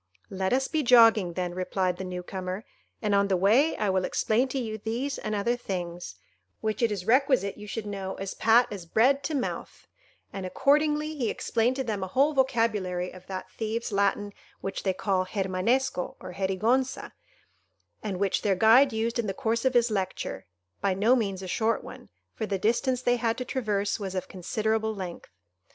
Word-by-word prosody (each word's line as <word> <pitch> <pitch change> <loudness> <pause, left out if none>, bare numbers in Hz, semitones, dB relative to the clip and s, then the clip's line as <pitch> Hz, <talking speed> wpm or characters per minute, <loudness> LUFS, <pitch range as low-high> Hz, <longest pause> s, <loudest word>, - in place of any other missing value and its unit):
"Let 190 -1 -1
us 265 +1 +2
be 315 - 0
jogging, 225 - +6
then," 180 0 -3
replied 185 0 -1
the 190 - -5
new 180 -1 -5
comer, 185 +3 -5 0.4
"and 210 -1 +1
on 200 0 +3
the 190 -2 +2
way 230 - +3
I 210 -2 +1
will 190 0 +1
explain 225 +7 +1
to 260 - -4
you 220 -4 -3
these 240 +6 -3
and 215 0 -3
other 235 +4 +1
things, 175 - -5 0.4
which 215 0 -2
it 230 -2 +3
is 195 -3 -3
requisite 255 -4 +3
you 210 0 -10
should 215 +1 -4
know 195 -2 -4
as 195 0 -5
pat 230 +2 +4
as 190 -5 -7
bread 260 +9 +3
to 310 - -1
mouth;" 260 - -4 0.5
and, 195 - -5
accordingly, 300 +8 +2
he 250 -6 -1
explained 235 +2 0
to 265 - -1
them 210 -5 -3
a - - -3
whole 275 +9 +2
vocabulary 220 -9 0
of 185 0 -14
that 190 -1 -6
thieves' 225 +1 -3
Latin 200 0 0 0.3
which 195 - -4
they 190 - 0
call 185 -2 0
Germanesco, 190 +2 0
or 180 - -8
Gerigonza, 220 +8 0 0.9
and 200 -4 -3
which 200 -1 +1
their 200 -2 +2
guide 230 +8 +6
used 230 +2 -1
in 225 - 0
the 195 - -3
course 230 +4 -1
of 260 -1 +2
his 240 -1 +4
lecture,—by 180 - -4
no 220 +6 +4
means 195 -6 -2
a - - -5
short 225 +4 0
one, - - -11 0.2
for 220 - -4
the 200 - -1
distance 240 +5 +1
they 245 0 +3
had 230 0 0
to 255 - -4
traverse 210 -6 -1
was 190 -2 -5
of 185 - -3
considerable 220 +4 -1
length. 185 -3 -7
215 Hz, 190 wpm, -27 LUFS, 190-240 Hz, 0.9 s, jogging